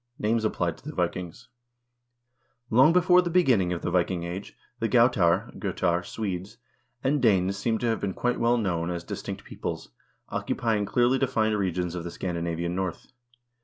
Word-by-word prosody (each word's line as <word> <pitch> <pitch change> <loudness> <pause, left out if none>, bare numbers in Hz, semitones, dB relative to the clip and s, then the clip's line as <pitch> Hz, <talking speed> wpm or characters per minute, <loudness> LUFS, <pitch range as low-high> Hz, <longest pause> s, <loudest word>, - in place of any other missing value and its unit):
Names 110 +1 0
Applied 110 - -1
to - - -24
the - - -8
Vikings 90 -3 -3 1.2
Long 130 +7 +6
before 180 +1 +5
the 175 - -2
beginning 130 - +3
of 85 - -3
the - - -1
Viking 90 0 +1
Age 90 +4 -6 0.2
the 115 - 0
Gautar 115 -9 +3
(Gotar), 85 -1 0
Swedes, 95 -1 -5 0.5
and 140 +1 +1
Danes 100 -5 +3
seem 110 +3 0
to 120 - -3
have 115 -1 +1
been 95 -2 -3
quite 125 0 0
well 120 +1 +3
known 90 -6 -1
as 85 -1 -3
distinct - - -6
peoples, - - -6 0.4
occupying 110 -3 -1
clearly 125 +4 +2
defined 110 -5 +1
regions 90 -3 -1
of 90 -1 -4
the 85 - -5
Scandinavian 85 -1 -3
North. 95 -1 -4
100 Hz, 165 wpm, -27 LUFS, 90-120 Hz, 1.2 s, Long